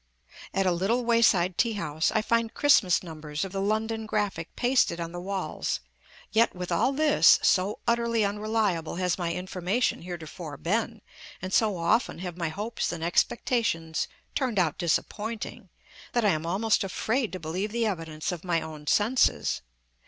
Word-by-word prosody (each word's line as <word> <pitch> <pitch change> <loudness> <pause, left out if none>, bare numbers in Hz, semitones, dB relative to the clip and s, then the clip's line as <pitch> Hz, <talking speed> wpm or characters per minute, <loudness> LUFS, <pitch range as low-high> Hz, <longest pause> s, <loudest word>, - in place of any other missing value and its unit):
At 195 0 0
a 185 - +3
little 205 +8 0
way 230 0 +3
side 185 -5 +3
tea 230 -2 +3
house, 160 -5 -1
I 215 -1 +1
find 230 0 0
Christmas 210 -13 +4
numbers 155 -1 -5
of 190 - -7
the 195 0 -2
London 220 +2 -1
Graphic 205 -6 -2
pasted 245 -9 +2
on 170 0 -4
the 175 0 -6
walls; 190 0 -2 0.5
yet 225 -1 +3
with 180 0 -5
all 170 +10 +2
this, 300 +1 +5
so 195 +2 +2
utterly 235 -2 +2
unreliable 205 -5 -1
has 180 0 0
my 170 -1 -1
information 185 +6 -1
heretofore 165 -3 -7
been, 220 +4 -1 0.4
and 185 0 -5
so 215 -4 +3
often 170 +8 +1
have 180 -1 -5
my 170 -2 -2
hopes 210 +8 -3
and 165 -2 -5
expectations 170 -3 0 0.3
turned 255 -6 -1
out 170 -5 +1
disappointing, 210 +6 -2 0.4
that 240 -2 +2
I - - +5
am 160 -2 0
almost 210 +6 +2
afraid 220 +5 -1
to 185 - -4
believe 180 +6 -3
the 235 0 0
evidence 165 -6 -3
of 175 -2 -6
my 175 -3 +1
own 155 -2 -9
senses. 225 - +2
195 Hz, 165 wpm, -27 LUFS, 170-225 Hz, 0.5 s, this